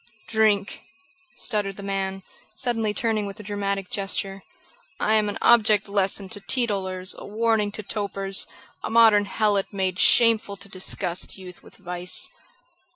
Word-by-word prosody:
"Drink!" 215 -2 +2 0.5
stuttered 205 -4 0
the 200 - -8
man, 195 -1 -3 0.3
suddenly 225 -2 0
turning 215 -1 -1
with 200 +2 -8
a - - -8
dramatic 200 -2 -3
gesture. 195 0 -2 0.6
"I 215 - +2
am 215 -1 +3
an 205 - -4
object 215 -3 +5
lesson 200 0 0
to 205 - -1
teetotalers; 195 -5 -1
a - - -9
warning 220 -1 +1
to 215 - -6
topers; 195 -2 -2 0.4
a - - -3
modern 220 -3 +6
helot 205 -1 0
made 190 -2 -1
shameful 220 0 +4
to 200 - -9
disgust 185 -2 -1
youth 180 -2 -11
with - - -15
vice." 180 -1 -4
200 Hz, 145 wpm, -24 LUFS, 195-215 Hz, 0.6 s, modern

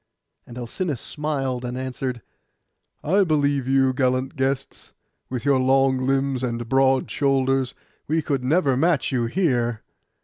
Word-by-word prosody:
And 120 - -10
Alcinous 125 +4 -3
smiled, 135 -4 -3
and 125 0 -4
answered, 130 -2 -4 0.8
'I 195 +6 +3
believe 145 -4 +1
you, 135 -1 +3
gallant 130 0 0
guests; 135 0 -3 0.4
with 125 +1 -4
your 140 -2 +3
long 130 0 +2
limbs 135 -1 0
and 120 -2 -3
broad 135 +1 +2
shoulders, 135 -2 +1 0.3
we 160 +1 0
could 140 -4 -1
never 140 0 +2
match 150 +1 +1
you 120 -3 0
here. 120 - 0
135 Hz, 135 wpm, -23 LUFS, 125-140 Hz, 0.8 s, I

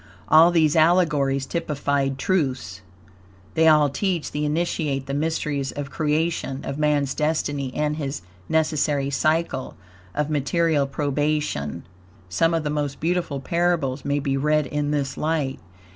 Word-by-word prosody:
All 160 +2 +7
these 160 -4 +3
allegories 150 -5 +3
typified 140 -4 -1
TRUTHS. 130 - -1 0.7
They 160 0 +4
all 150 -2 +6
teach 175 +3 -2
the 150 0 -2
Initiate 150 -3 -1
the 135 - -4
mysteries 145 -2 -1
of 145 -1 -6
creation, 155 -3 -1
of 140 - -4
man's 145 -3 +1
destiny 145 -3 -1
and 150 0 0
his 140 -7 -4 0.3
necessary 150 -3 +1
Cycle 155 -2 0 0.4
of 150 0 0
Material 150 0 +1
Probation. 145 - -1 0.5
Some 165 - +2
of 165 - -1
the 150 - -2
most 145 -2 -2
beautiful 170 -4 -1
parables 150 -3 0
may 145 0 0
be 135 -1 -1
read 150 +1 +2
in 145 +2 -2
this 140 -2 -1
light. 150 -4 -1
150 Hz, 135 wpm, -23 LUFS, 140-160 Hz, 0.7 s, All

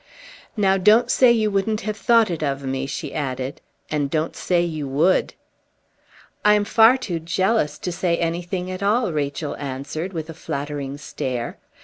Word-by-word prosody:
"Now, 195 -2 +3
don't 210 +5 +4
say 255 -2 +6
you 220 -3 +2
wouldn't 210 +2 0
have 215 -2 -3
thought 225 -1 +3
it 165 - -3
of 140 -2 -2
me," 135 0 -2
she 135 - -5
added, 130 -2 -4 0.3
"and 145 -2 0
don't 155 +2 -1
say 175 -1 +1
you 155 -4 -3
would!" 155 +8 +2 1.1
"I 210 0 +6
am 205 -1 +1
far 225 +4 +6
too 185 -10 -3
jealous 170 -1 0
to 180 - -4
say 170 0 0
anything 175 +2 -2
at 185 +1 -6
all," 210 -1 +1
Rachel 145 0 -2
answered 140 +6 -5
with 160 -4 -5
a 165 - -7
flattering 140 -1 -5
stare. 125 -4 -4
170 Hz, 165 wpm, -22 LUFS, 145-205 Hz, 1.1 s, say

